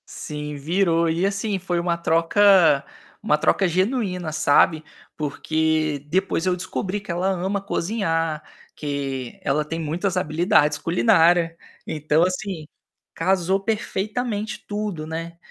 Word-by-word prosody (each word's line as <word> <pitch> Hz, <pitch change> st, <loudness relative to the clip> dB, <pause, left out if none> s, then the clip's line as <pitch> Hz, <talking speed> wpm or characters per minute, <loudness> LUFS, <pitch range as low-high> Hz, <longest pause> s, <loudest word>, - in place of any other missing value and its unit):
Sim, 150 Hz, 0 st, -6 dB
virou. 165 Hz, +2 st, +1 dB
E, 170 Hz, +3 st, 0 dB
assim, 200 Hz, +1 st, -1 dB
foi 175 Hz, -1 st, -1 dB
uma 170 Hz, 0 st, 0 dB
troca 170 Hz, -2 st, +4 dB, 0.4 s
uma 150 Hz, -, +3 dB
troca 195 Hz, -, +2 dB
genuína, 185 Hz, -2 st, -1 dB
sabe, 155 Hz, +2 st, +3 dB, 0.3 s
porque 155 Hz, 0 st, -1 dB
depois 185 Hz, 0 st, 0 dB
eu 180 Hz, -, +2 dB
descobri 185 Hz, +2 st, -3 dB
que 200 Hz, -3 st, -7 dB
ela 175 Hz, +2 st, -1 dB
ama 190 Hz, +2 st, -1 dB
cozinhar, 165 Hz, -6 st, -1 dB, 0.3 s
que 135 Hz, -4 st, -4 dB
ela 150 Hz, +2 st, +1 dB
tem 165 Hz, +2 st, -5 dB
muitas 170 Hz, +5 st, -2 dB
habilidades 155 Hz, -3 st, +2 dB
culinária. 170 Hz, -1 st, +3 dB, 0.3 s
Então, 155 Hz, +1 st, +1 dB
assim, 185 Hz, -2 st, -2 dB, 0.5 s
casou 185 Hz, +2 st, +1 dB
perfeitamente 215 Hz, +1 st, -3 dB
tudo, 205 Hz, -6 st, -3 dB
né. 165 Hz, +1 st, -6 dB
170 Hz, 120 wpm, -23 LUFS, 155-195 Hz, 0.5 s, troca